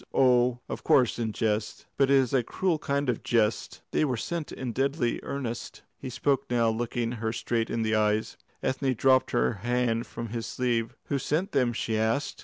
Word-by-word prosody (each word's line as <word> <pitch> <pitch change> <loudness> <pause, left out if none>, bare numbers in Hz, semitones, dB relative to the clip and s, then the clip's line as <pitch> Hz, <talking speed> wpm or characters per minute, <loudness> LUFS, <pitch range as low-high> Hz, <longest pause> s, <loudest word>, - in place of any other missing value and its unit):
Oh, 125 -2 +4
of - - -6
course 125 -3 +3
in 115 -2 -1
jest. 105 0 -2
But 135 -1 +3
it 140 - +6
is 130 -2 +3
a 130 - +4
cruel 165 +7 -1
kind 140 -1 -1
of 125 -3 0
jest 110 -2 0
" - - -52
"They - - +2
were 130 -5 0
sent 165 +6 -4
in 130 -2 -4
deadly 135 0 0
earnest." 125 -4 -5 0.2
He - - -6
spoke 135 +2 0
now, 120 -2 +3
looking 115 +1 -2
her 115 -2 -2
straight 115 0 -1
in 115 - -1
the 110 0 0
eyes. 110 0 +1 0.3
Ethne 130 0 0
dropped 130 +2 +4
her 65 +1 +1
hand 120 0 0
from 115 0 -6
his 115 0 -4
sleeve. 120 0 -1
"Who 140 - +1
sent 155 +8 -1
them?" 130 -4 +2
she 110 -1 -1
asked. 115 +7 0
120 Hz, 200 wpm, -28 LUFS, 115-135 Hz, 0.3 s, it